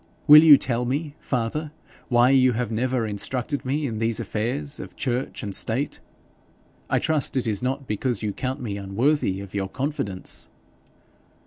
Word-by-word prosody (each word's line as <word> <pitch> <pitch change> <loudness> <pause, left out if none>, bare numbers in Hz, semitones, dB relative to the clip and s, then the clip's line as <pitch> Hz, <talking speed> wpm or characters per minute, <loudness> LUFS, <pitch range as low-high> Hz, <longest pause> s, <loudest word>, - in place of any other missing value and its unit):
Will 150 +1 +10
you 150 -3 +9
tell 125 -2 -1
me, 140 +4 -2
father, 135 +5 -2 0.4
why 120 0 +4
you 130 -2 +4
have 115 -1 -2
never 125 +1 0
instructed 125 +7 -3
me 145 +3 -1
in 110 -5 -3
these 115 -1 0
affairs 105 - -3
of - - -9
church 125 0 -3
and 100 -2 -4
state? 125 +8 0 0.9
I - - +2
trust 150 -3 0
it 130 - 0
is 105 -3 -1
not 135 +2 -2
because 115 0 -2
you 105 -2 -1
count 130 +4 -3
me 105 -5 -4
unworthy 100 +1 0
of 100 -1 -10
your 100 -1 -2
confidence.' 130 - -3
125 Hz, 160 wpm, -24 LUFS, 110-135 Hz, 0.9 s, Will